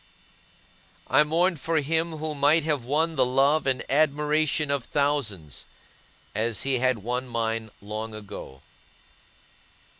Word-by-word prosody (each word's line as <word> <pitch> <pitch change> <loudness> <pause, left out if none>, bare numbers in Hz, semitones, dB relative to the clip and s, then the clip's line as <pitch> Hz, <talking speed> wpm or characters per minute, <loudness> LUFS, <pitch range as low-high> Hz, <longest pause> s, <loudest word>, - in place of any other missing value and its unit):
I 150 +3 +6
mourned 170 +2 +1
for 165 +3 0
him 160 +3 0
who 155 0 -3
might 150 +3 +3
have 145 -6 -1
won 160 +5 0
the 130 - +4
love 135 +4 +2
and 130 -2 0
admiration 150 +1 +1
of 140 -4 -1
thousands, 115 - -1 0.7
as 115 +1 0
he 135 -2 +1
had 130 -4 +1
won 125 +3 -2
mine 115 -1 -2
long 110 +1 -5
ago. 95 -10 -9
140 Hz, 125 wpm, -26 LUFS, 115-155 Hz, 0.7 s, I